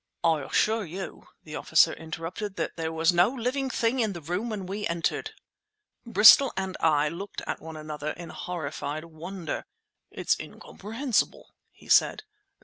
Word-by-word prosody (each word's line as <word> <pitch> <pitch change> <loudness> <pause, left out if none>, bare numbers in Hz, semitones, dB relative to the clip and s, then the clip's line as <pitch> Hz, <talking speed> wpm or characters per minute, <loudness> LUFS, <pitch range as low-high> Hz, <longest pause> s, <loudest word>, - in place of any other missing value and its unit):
"I 160 -3 +3
assure 220 +10 +1
you," 185 +1 -7 0.2
the 155 -1 -8
officer 160 - +4
interrupted, 165 +5 -6
"that - - -3
there 160 -1 -3
was 160 +2 +2
no 175 +4 +5
living 260 +2 -2
thing 240 +1 0
in 220 -4 +1
the 170 - -7
room 180 +9 -3
when 205 -4 -4
we 205 +3 -3
entered." 170 0 -2 0.7
Bristol 225 +5 +8
and 190 -1 -2
I 150 -2 +3
looked 180 +6 -6
at - - -4
one 160 0 -8
another 150 -1 -5
in 170 -1 -9
horrified 155 -3 -5
wonder. 165 +2 -6 0.5
"It's - - 0
incomprehensible!" 225 +3 -3 0.2
he - - -20
said. - - +4
180 Hz, 150 wpm, -27 LUFS, 160-210 Hz, 0.7 s, Bristol